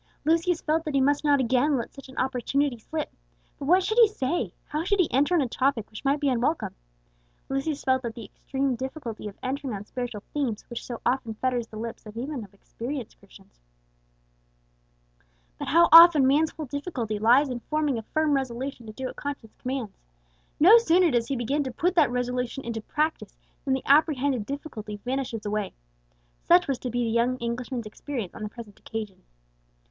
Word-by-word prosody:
Lucius 330 +2 +2
felt 315 +1 0
that 305 -3 -3
he - - +4
must 285 +2 +2
not 290 -2 +4
again 260 +3 +2
let 235 - -5
such 275 -1 -12
an 260 - -13
opportunity 265 0 0
slip. 310 +7 -5 0.5
But 280 - -5
what 365 +4 +5
should 435 +5 +1
he 460 - +9
say, 345 -4 -2
how 305 +1 -3
should 400 +3 +1
he 355 - +4
enter 290 +7 +3
on 335 - +4
a 265 - 0
topic 255 -2 0
which 215 - -9
might 280 +1 +2
be 285 - 0
unwelcome? 260 +5 0 0.8
Lucius 275 +2 -2
felt 260 -1 +2
that 235 -2 -6
extreme 265 +4 -3
difficulty 260 -4 -6
of 200 - -9
entering 265 -2 -3
on 200 +1 -7
spiritual 240 -3 -5
themes 255 -8 -2
which 235 - -5
so 240 -2 -7
often 240 -3 0
fetters 245 0 -1
the 215 - -10
lips 225 0 -6
even 255 +1 -4
of 200 - -13
experienced 235 +5 -7
Christians. - - -19 2.0
But - - -4
how 335 +2 +5
often 330 -4 +10
man's 300 +4 +3
whole 310 - -7
difficulty 255 - -4
lies 250 +6 +5
in 245 - -3
forming 300 -2 -1
a 220 - -13
firm 310 -1 +2
resolution 260 -2 -3
to 215 - -8
do 260 +3 -6
what - - -5
conscience 280 -6 -6
commands. 255 -5 -4 0.6
No 405 +10 +9
sooner 360 -5 +4
does 235 -2 +1
he 275 - -1
begin 270 +5 0
to 260 - -3
put 340 +9 0
that 320 -6 +4
resolution 250 +1 -2
into 230 -1 -3
practice 305 +8 -2 0.3
than 265 -1 +2
the 265 - -5
apprehended 280 -5 +3
difficulty 220 -7 -6
vanishes 250 -4 -3
away! 210 -1 -2 0.7
Such 350 +1 +4
was 275 -3 -1
to 250 - -4
be 245 +1 -1
the 225 - -1
young 235 +2 +1
Englishman's 235 0 -4
experience 225 -2 -5
on - - -10
the 210 - -3
present 210 -2 -11
occasion. 215 -4 -6
265 Hz, 190 wpm, -26 LUFS, 235-295 Hz, 2.0 s, often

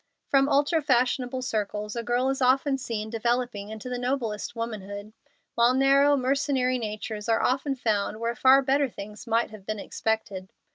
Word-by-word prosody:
From 275 0 +4
ultra 290 +3 +2
fashionable 255 -1 +1
circles 210 -2 -3
a 235 - -2
girl 245 +3 0
is 270 0 -2
often 270 +2 +3
seen 220 -3 -4
developing 235 -2 -1
into 220 +2 -8
the 250 -1 -3
noblest 245 -4 -2
womanhood; 210 -2 -6 0.4
while 240 +2 +3
narrow, 275 +2 +4
mercenary 260 -1 +1
natures 215 0 -5
are 225 - +2
often 275 +2 0
found 215 -3 -1
where 230 +1 -2
far 265 +2 +5
better 275 +1 +2
things 210 +1 -10
might 230 0 +1
have 215 -3 -11
been 215 0 -2
expected. 205 -3 -3
240 Hz, 160 wpm, -26 LUFS, 215-265 Hz, 0.4 s, far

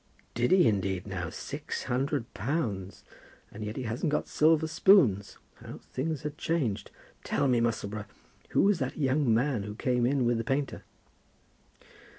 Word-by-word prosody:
"Did 120 +1 +1
he 185 -7 +5
indeed, 95 -3 0
now? 90 -4 -4
Six - - -5
hundred 130 0 -2
pounds! 100 - -3 0.5
And 110 - -7
yet 105 +1 -4
he 130 - -3
hasn't 120 +7 -2
got 150 - 0
silver 160 +1 +3
spoons. 160 - +4 0.3
How - - -8
things 150 +2 -4
are 150 - -1
changed! 145 -8 -2 0.3
Tell - - 0
me, 125 -2 +3
Musselboro, 105 -3 -2 0.4
who - - +3
was 200 -2 +3
that 130 -2 -3
young 140 -3 +2
man 120 0 +2
who 105 +1 -6
came 125 +1 +1
in 135 -1 +1
with 120 -1 +2
the - - -1
painter?" 135 +3 -2
125 Hz, 160 wpm, -29 LUFS, 105-145 Hz, 0.5 s, he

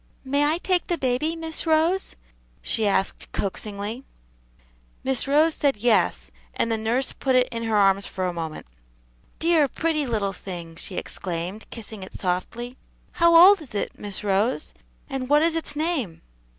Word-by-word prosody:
"May 285 +2 +2
I 310 +3 +3
take 360 0 0
the 345 - 0
baby, 265 +5 0
Miss 325 0 -3
Rose?" 325 +4 +2 0.5
she 220 -2 +1
asked 195 -1 -1
coaxingly. 205 +4 -4 1.0
Miss 265 0 0
Rose 305 +3 +4
said 280 -7 +1
"Yes," 145 - +2 0.2
and 230 - 0
the 225 - +1
nurse 235 +5 0
put 265 -1 0
it 250 0 +4
in 230 - -4
her 220 -1 +1
arms 195 0 +3
for 185 - -3
a 180 - -1
moment. 160 -2 -5 0.7
"Dear, 325 -3 +3
pretty 305 0 -1
little 205 -4 -1
thing!" 175 -3 -8
she 180 +3 -5
exclaimed, 180 +4 -5
kissing 220 -3 -9
it 190 - -9
softly. 230 +7 -3 0.3
"How 335 0 +4
old 370 +2 +9
is 255 -8 -11
it, 200 - -1
Miss 205 -1 -4
Rose? 210 +8 0 0.3
and 265 -2 -4
what 295 +1 +5
is 330 0 +2
its 325 -2 -3
name?" 300 - -1
245 Hz, 165 wpm, -24 LUFS, 200-310 Hz, 1.0 s, old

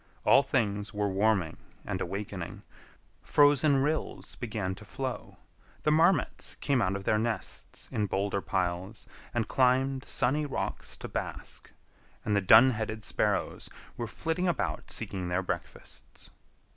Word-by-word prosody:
All 135 - +7
things 105 -7 -1
were 105 0 +1
warming 95 -4 +1 0.3
and - - -3
awakening. 95 -1 -5 0.6
Frozen 145 -1 +4
rills 155 +2 -2
began 105 -6 -3
to 95 - -11
flow, 130 +4 -5 0.5
the 150 - +3
marmots 165 +5 +2
came 140 -4 +1
out 95 -2 +1
of 100 - -4
their 105 +2 +2
nests 110 -3 -4
in 105 -1 0
boulder 100 +1 -1
piles 95 +3 -2 0.3
and 115 -2 -1
climbed 130 +1 +2
sunny 145 +5 +1
rocks 140 - -3
to - - -7
bask, - - -5 0.5
and 105 - +1
the 100 - +3
dun 110 +7 +8
headed 110 -1 -4
sparrows - - -1 0.3
were 120 - -4
flitting 165 +9 -2
about 175 - -1
seeking 95 -3 -2
their 90 +2 0
breakfasts. - - -7
110 Hz, 135 wpm, -29 LUFS, 100-135 Hz, 0.6 s, dun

